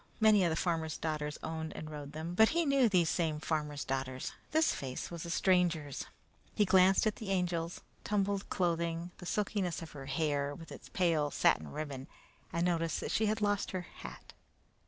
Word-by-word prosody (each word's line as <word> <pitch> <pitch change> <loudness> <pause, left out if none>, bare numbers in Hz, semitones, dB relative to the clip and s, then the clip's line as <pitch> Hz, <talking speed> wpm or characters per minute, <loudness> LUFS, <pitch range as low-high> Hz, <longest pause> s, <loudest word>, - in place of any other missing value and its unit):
Many 215 -3 +6
of 175 - +3
the 160 - 0
farmers' 160 -2 -1
daughters 150 -2 -2
owned 160 0 -4
and 155 0 -6
rode 145 -1 -7
them, 160 +3 -4
but 220 +4 +6
he 335 0 +1
knew 275 -4 +4
these 180 -4 +4
same 160 -2 0
farmers' 150 -2 -2
daughters; 130 -1 -2 0.2
this 315 +1 +3
face 130 +3 -5
was 170 0 -5
a - - -5
stranger's. 170 -6 +1 0.5
He 210 - +4
glanced 190 +1 +5
at 215 - +1
the 215 - -6
Angel's 175 -3 -1 0.2
tumbled 200 -1 0
clothing, 170 -1 0
the 180 - -7
silkiness 195 -4 -1
of 160 - -9
her 135 -2 -8
hair, 145 0 0
with 165 0 -11
its - - -10
pale 165 -5 +2
satin 75 - +2
ribbon, 140 - -5 0.4
and 170 +1 +1
noticed 165 -2 +1
that - - -3
she 220 - +2
had 215 +1 0
lost 205 -1 +1
her 185 - -1 0.2
hat. - - -10
170 Hz, 185 wpm, -33 LUFS, 150-190 Hz, 0.5 s, Many